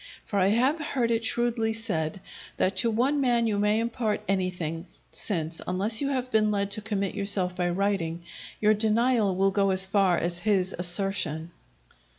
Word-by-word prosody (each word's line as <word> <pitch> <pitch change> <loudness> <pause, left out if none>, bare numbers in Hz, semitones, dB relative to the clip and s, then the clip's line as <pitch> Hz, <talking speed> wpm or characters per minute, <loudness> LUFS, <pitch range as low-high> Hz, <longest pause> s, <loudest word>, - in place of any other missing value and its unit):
For 200 - -1
I 185 - +3
have 255 +9 +2
heard 260 -6 -1
it 230 0 0
shrewdly 225 -1 0
said 190 -6 -3 0.4
that 190 +1 +1
to 230 - +3
one 260 +6 +1
man 240 -3 +2
you 210 -2 0
may 210 +1 +2
impart 230 -2 -2
anything, 180 -3 -2 0.2
since, 165 -5 0
unless 200 +6 +1
you 280 - 0
have 255 -2 -2
been 215 -1 +3
led 200 -1 -1
to 215 - 0
commit 200 -2 -2
yourself 200 -3 +1
by 180 -1 -1
writing, 175 -3 -1 0.4
your 215 0 +4
denial 220 -1 +1
will 195 +1 +2
go 195 0 +1
as 190 0 +3
far 190 -2 +2
as 175 0 -2
his 195 -2 0
assertion. 175 -3 0
200 Hz, 170 wpm, -26 LUFS, 185-225 Hz, 0.4 s, your